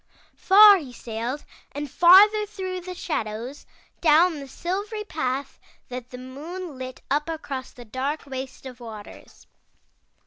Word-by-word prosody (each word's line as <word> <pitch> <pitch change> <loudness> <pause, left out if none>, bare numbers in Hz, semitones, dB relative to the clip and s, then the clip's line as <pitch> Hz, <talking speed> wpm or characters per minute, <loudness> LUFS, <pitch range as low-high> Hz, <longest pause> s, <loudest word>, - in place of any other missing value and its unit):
Far 410 +1 +8
he 290 -8 -8
sailed 240 +4 -5 0.3
and 290 +1 -4
farther 405 +8 +6
through 375 -3 -5
the 365 +1 -7
shadows, 235 -5 -4 0.3
down 320 0 +4
the 275 - -8
silvery 405 - -4
path 275 -8 -3 0.3
that 250 -1 -7
the 250 - -9
moon 300 +6 -8
lit 255 0 -8
up 295 +3 +1
across 290 -5 -5
the 245 - -13
dark 265 +7 -3
waste 265 -1 -7
of 255 -1 -9
the - - -12
waters. 215 -3 -11
290 Hz, 140 wpm, -24 LUFS, 255-365 Hz, 0.3 s, Far